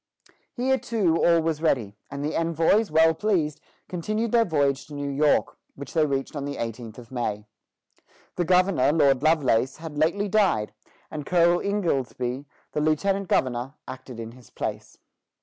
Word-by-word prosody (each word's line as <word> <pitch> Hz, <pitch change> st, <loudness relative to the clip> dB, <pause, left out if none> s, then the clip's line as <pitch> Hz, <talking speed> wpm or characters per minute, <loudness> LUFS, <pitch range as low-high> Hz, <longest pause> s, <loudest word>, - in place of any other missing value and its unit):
Here 265 Hz, +1 st, +1 dB
too, 190 Hz, -8 st, 0 dB
all 170 Hz, -1 st, +5 dB
was 160 Hz, -1 st, -1 dB
ready, 120 Hz, -11 st, 0 dB
and 140 Hz, +1 st, -5 dB
the 155 Hz, -, -2 dB
envoys, 165 Hz, +6 st, +2 dB
well 160 Hz, +1 st, +4 dB
pleased, 160 Hz, -5 st, -1 dB, 0.3 s
continued 215 Hz, +6 st, -2 dB
their 235 Hz, -1 st, +4 dB
voyage 140 Hz, -6 st, 0 dB
to 145 Hz, -, -9 dB
New 145 Hz, 0 st, -3 dB
York, 145 Hz, +2 st, +1 dB, 0.2 s
which 140 Hz, -, -9 dB
they 160 Hz, -3 st, +3 dB
reached 135 Hz, +1 st, -3 dB
on 145 Hz, -, -3 dB
the 140 Hz, 0 st, -4 dB
eighteenth 115 Hz, -1 st, -6 dB
of 120 Hz, -1 st, -12 dB
May. 105 Hz, -4 st, -3 dB, 0.9 s
The 175 Hz, -, 0 dB
governor, 180 Hz, -6 st, +3 dB
Lord 140 Hz, -4 st, +3 dB
Lovelace, 135 Hz, -5 st, +2 dB
had 160 Hz, -2 st, -7 dB
lately 175 Hz, +7 st, +1 dB
died, 185 Hz, -, +1 dB, 0.4 s
and 150 Hz, -2 st, -5 dB
Colonel 175 Hz, +2 st, +3 dB
Ingoldsby, 135 Hz, -9 st, -2 dB, 0.3 s
the 150 Hz, -, -1 dB
lieutenant 190 Hz, +6 st, +1 dB
governor, 130 Hz, -1 st, 0 dB
acted 130 Hz, -2 st, -9 dB
in 115 Hz, 0 st, -6 dB
his 125 Hz, -2 st, -17 dB
place. -, -, -6 dB
150 Hz, 160 wpm, -25 LUFS, 130-175 Hz, 0.9 s, all